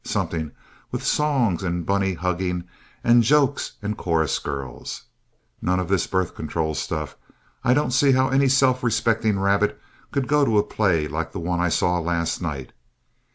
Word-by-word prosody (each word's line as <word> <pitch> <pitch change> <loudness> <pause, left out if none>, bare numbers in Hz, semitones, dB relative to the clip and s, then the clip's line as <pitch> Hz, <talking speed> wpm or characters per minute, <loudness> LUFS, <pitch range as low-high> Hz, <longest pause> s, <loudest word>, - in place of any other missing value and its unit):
Something 80 -2 -2 0.4
with - - -4
songs 130 - +1
and 85 -2 -2
bunny 95 -1 +1
hugging 90 0 -2 0.4
and 120 0 +6
jokes 140 +3 +2
and 105 +1 -2
chorus 80 -6 0
girls. 65 -3 -6 0.6
None 90 +1 +1
of 90 -1 -3
this 95 -3 +1
birth 95 -2 -1
control 80 0 -2
stuff. 75 +1 -4 0.5
I 125 - +4
don't 145 -2 +1
see 135 +1 +4
how 130 +1 +3
any 135 +1 +3
self 130 -1 +3
respecting 115 -2 +1
rabbit 100 +1 +1 0.3
could 135 -3 -1
go 150 0 +3
to 115 -6 +2
a 105 - +4
play 90 -8 +1
like 80 +3 -4
the - - -4
one 85 +1 -1
I 90 0 +2
saw 90 +2 +1
last 85 0 -1
night. 75 -7 -4
95 Hz, 165 wpm, -23 LUFS, 85-120 Hz, 0.6 s, and